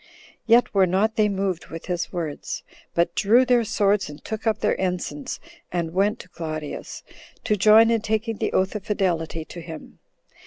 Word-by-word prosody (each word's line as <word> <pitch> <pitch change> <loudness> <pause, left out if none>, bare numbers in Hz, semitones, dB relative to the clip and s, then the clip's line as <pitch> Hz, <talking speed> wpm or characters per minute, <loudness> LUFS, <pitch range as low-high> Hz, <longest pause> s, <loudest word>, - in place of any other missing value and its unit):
Yet 235 +2 +5
were 195 -2 +4
not 205 +5 +1
they 215 -1 +3
moved 190 -3 -2
with 165 0 -8
his 175 -1 -2
words, 165 -5 -4 0.3
but 170 0 +2
drew 230 +6 +4
their 245 -1 +4
swords, 205 -3 +1
and 145 0 -12
took 220 +1 -4
up 220 - +2
their 210 - +2
ensigns, 190 +10 -3 0.3
and 170 -2 -2
went 205 +4 +2
to 180 - -17
Claudius, 155 -3 -6 0.4
to 210 - +2
join 215 +3 +6
in 230 -2 +2
taking 220 +1 -1
the - - -1
oath 190 +1 +1
of 210 -3 -5
fidelity 165 -6 -1
to 170 - -9
him. 160 -2 -10
195 Hz, 180 wpm, -24 LUFS, 170-220 Hz, 0.4 s, join